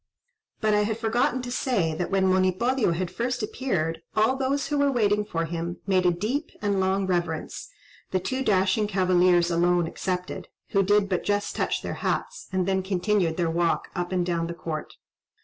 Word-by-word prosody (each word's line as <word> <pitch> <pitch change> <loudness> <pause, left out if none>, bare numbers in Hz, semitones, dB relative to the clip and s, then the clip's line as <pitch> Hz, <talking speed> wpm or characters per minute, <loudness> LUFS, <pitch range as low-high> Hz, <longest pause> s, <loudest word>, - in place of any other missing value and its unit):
But 215 -1 +2
I 210 - +4
had 215 +1 -1
forgotten 240 +3 0
to 245 - -5
say, 205 -11 0
that 175 +3 -3
when 195 -1 +2
Monipodio 185 +4 +2
had 175 +1 -3
first 245 0 -2
appeared, 165 -9 -2
all 220 +5 +3
those 275 +1 -1
who 295 -1 0
were 285 0 +3
waiting 210 -4 +2
for 165 -5 -2
him, 170 +1 -4
made 185 -2 +2
a - - +5
deep 225 - -2
and 200 -2 0
long 190 +1 +1
reverence, 175 - -2 0.4
the 185 - 0
two 260 +9 -2
dashing 195 0 +2
cavaliers 180 -3 +3
alone 175 0 +3
excepted, 180 +2 -4 0.2
who 195 - +3
did 205 +1 +3
but 185 -2 -1
just 205 0 -1
touch - - -1
their - - -3
hats, - - -2
and 185 -1 0
then 190 0 +1
continued 185 -2 0
their 170 -2 +1
walk 170 0 0
up 175 -1 -2
and 180 -2 +1
down 170 -1 -1
the 170 - -5
court. 155 -3 -5
190 Hz, 185 wpm, -26 LUFS, 175-215 Hz, 0.4 s, a